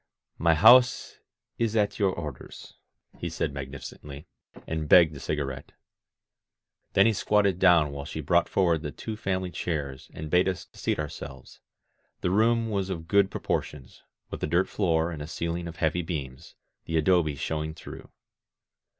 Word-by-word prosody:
"My 80 0 +4
house 125 +10 +5 0.4
is 115 -1 0
at 105 -1 +1
your 100 -2 +3
orders," 75 -8 -8 0.5
he 85 - -3
said 80 -2 -3
magnificently, 70 +1 -8 0.4
and 80 -2 -4
begged 80 -4 +6
a - - -8
cigarette. 70 -3 -4 1.2
Then 100 - +5
he 115 - +4
squatted 100 -2 +1
down 85 -6 +5
while 70 0 -6
she 80 - -6
brought 85 +4 +2
forward 85 -5 +2
the 75 - -4
two 110 +9 -6
family 95 -3 -2
chairs 70 -7 -4
and 75 0 -7
bade 90 +1 +4
us 90 -1 -5
seat - - -2
our 75 - -2
selves. 70 -2 -10 0.6
The 90 - 0
room 115 +2 +2
was 100 -2 -1
of 80 -3 -5
good 100 +1 +3
proportions, 70 -8 -4 0.3
with - - -6
a - - -1
dirt 85 +4 +2
floor 85 -4 0
and 75 -3 -6
a 75 - -6
ceiling 85 +1 -3
of 85 - -8
heavy 80 +2 0
beams, 70 -6 -6 0.3
the 80 - -1
adobe 80 -2 +2
showing 80 +2 -3
through. - - -11
85 Hz, 160 wpm, -27 LUFS, 75-95 Hz, 1.2 s, begged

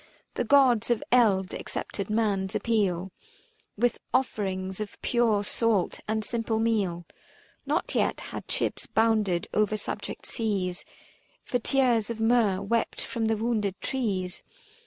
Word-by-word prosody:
The - - -1
Gods 245 -3 +4
of 240 -2 +1
eld 205 -7 +4
accepted 200 -1 -4
man's 205 -3 0
appeal 195 -5 0 0.7
With 240 +2 +1 0.2
offerings 190 -7 -1
of 210 - -6
pure 230 -4 +2
salt 215 -2 0
and 220 0 -1
simple 230 -1 -1
meal. 205 -7 0 0.6
Not - - 0
yet - - +1
had - - -7
ships - - -1
bounded 215 -6 +2
o'er 215 0 +2
subject 205 - -5
seas 195 -5 -1 0.6
365 - - -18
For 245 - +2
tears 240 -4 +2
of 230 -1 -4
myrrh, 225 -4 +3
wept 230 +3 0
from 230 -3 -2
the 220 0 +1
wounded 215 -4 -1
trees. 195 -9 -2
215 Hz, 135 wpm, -27 LUFS, 195-230 Hz, 0.7 s, Gods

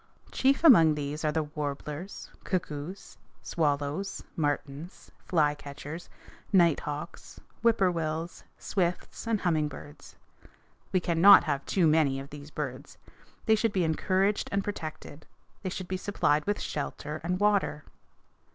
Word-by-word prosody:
Chief 270 +3 +2
among 165 - +8
these 150 +1 -4
are 155 - +2
the 160 +1 0
warblers, 150 +3 -6
cuckoos, 170 0 -4 0.2
swallows, 150 +4 -1
martins, 145 +1 -3 0.2
flycatchers, 150 0 -2 0.4
nighthawks, 165 -4 0 0.2
whippoorwills, 175 -7 0
swifts, 180 +3 -2
and 225 -3 +1
humming 160 -4 +1
birds. 145 0 -11 0.8
We 185 - +2
cannot 175 +4 +7
have 140 -3 -1
too 185 -4 +2
many 155 -4 +3
of 135 +1 -9
these 145 0 -9
birds. 140 -2 -6 0.5
They 220 - +4
should 220 0 +1
be 185 - +2
encouraged 190 +5 +1
and 200 0 0
protected. 155 -6 -7 0.3
They 190 - -3
should 185 0 -5
be 185 - -2
supplied 155 -6 +1
with 205 - 0
shelter 150 +1 -4
and 180 +2 -1
water. 200 -7 +1
160 Hz, 125 wpm, -29 LUFS, 150-190 Hz, 0.8 s, among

